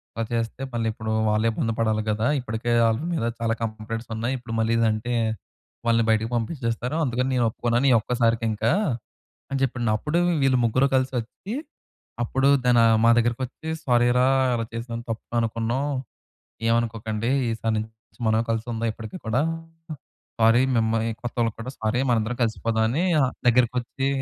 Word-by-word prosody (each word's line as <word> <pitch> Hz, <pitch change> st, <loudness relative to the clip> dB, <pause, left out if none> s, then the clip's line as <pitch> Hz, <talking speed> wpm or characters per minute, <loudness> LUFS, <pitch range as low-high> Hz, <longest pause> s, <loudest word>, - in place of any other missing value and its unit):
అలా 115 Hz, -, -1 dB
చేస్తే 115 Hz, +2 st, -2 dB
మళ్ళీ 115 Hz, -1 st, -1 dB
ఇప్పుడు 110 Hz, 0 st, -4 dB, 0.2 s
వాళ్ళే 110 Hz, +2 st, +2 dB
ఇబ్బంది 115 Hz, 0 st, -1 dB
పడాలి 110 Hz, -1 st, +1 dB
కదా. 110 Hz, +1 st, 0 dB
ఇప్పటికే 120 Hz, -1 st, -3 dB
వాళ్ళ 115 Hz, +1 st, +2 dB
మీద 160 Hz, -, -1 dB, 0.2 s
చాలా 115 Hz, -1 st, +1 dB
కంప్లయింట్స్ 115 Hz, +1 st, -4 dB
ఉన్నాయి. 115 Hz, +4 st, -1 dB
ఇప్పుడు 120 Hz, -2 st, -8 dB
మళ్ళీ 115 Hz, +1 st, +2 dB
ఇది 115 Hz, -, +3 dB
అంటే 110 Hz, +3 st, -3 dB, 0.7 s
వాళ్ళని 115 Hz, -1 st, +3 dB
బయటకి 110 Hz, 0 st, +2 dB
పంపించేస్తారు. 120 Hz, +1 st, -2 dB
అందుకని 125 Hz, 0 st, 0 dB
నేను 120 Hz, -, +2 dB
ఒప్పుకున్నాను. 120 Hz, +4 st, 0 dB
ఈ -, -, +6 dB
ఒక్కసారికి 115 Hz, -1 st, +1 dB
ఇంకా" 110 Hz, +3 st, 0 dB, 0.8 s
అని 135 Hz, -, -1 dB
చెప్పాడండి. 120 Hz, -3 st, 0 dB
అప్పుడు 155 Hz, +7 st, -1 dB, 0.2 s
వీళ్ళు 130 Hz, -2 st, +3 dB
ముగ్గురు 130 Hz, +4 st, +2 dB
కలిసి 130 Hz, 0 st, +1 dB
ఒచ్చి 190 Hz, -, -8 dB, 0.7 s
అప్పుడు 135 Hz, +3 st, +1 dB, 0.2 s
దనా 120 Hz, -1 st, +5 dB, 0.2 s
మా 115 Hz, -, +7 dB
దగ్గరకి 120 Hz, +2 st, +1 dB
వచ్చి 155 Hz, +5 st, -11 dB, 0.2 s
"సారీరా 120 Hz, +1 st, +4 dB, 0.3 s
అలా 115 Hz, -1 st, -1 dB
చేసినందుకు 115 Hz, 0 st, -5 dB
తప్పుగా 115 Hz, +1 st, -7 dB
అనుకున్నాం. 115 Hz, +3 st, -1 dB, 0.8 s
ఏమనుకోకండి. 115 Hz, -1 st, 0 dB, 0.2 s
ఈసారి 115 Hz, 0 st, -1 dB
నుంచి 110 Hz, +1 st, -3 dB, 0.4 s
మనమే 110 Hz, +1 st, +3 dB
కలిసి 115 Hz, 0 st, -1 dB
ఉందాం 115 Hz, 0 st, -1 dB
ఎప్పటికి 110 Hz, +7 st, -8 dB
కూడా. 115 Hz, +4 st, +1 dB, 1.0 s
సారీ 115 Hz, +2 st, +5 dB, 0.2 s
మిమ్మల్ని 115 Hz, 0 st, +1 dB
కొత్తవాళ్ళకి 120 Hz, -2 st, -1 dB
కూడా 125 Hz, -, -5 dB
సారీ 110 Hz, +3 st, 0 dB
మనందరం 115 Hz, +1 st, +1 dB
కలిసిపోదాం" 110 Hz, 0 st, 0 dB
అని 150 Hz, +10 st, 0 dB, 0.4 s
దగ్గరకొచ్చి 125 Hz, +2 st, +2 dB
115 Hz, 150 wpm, -24 LUFS, 110-125 Hz, 1.0 s, మా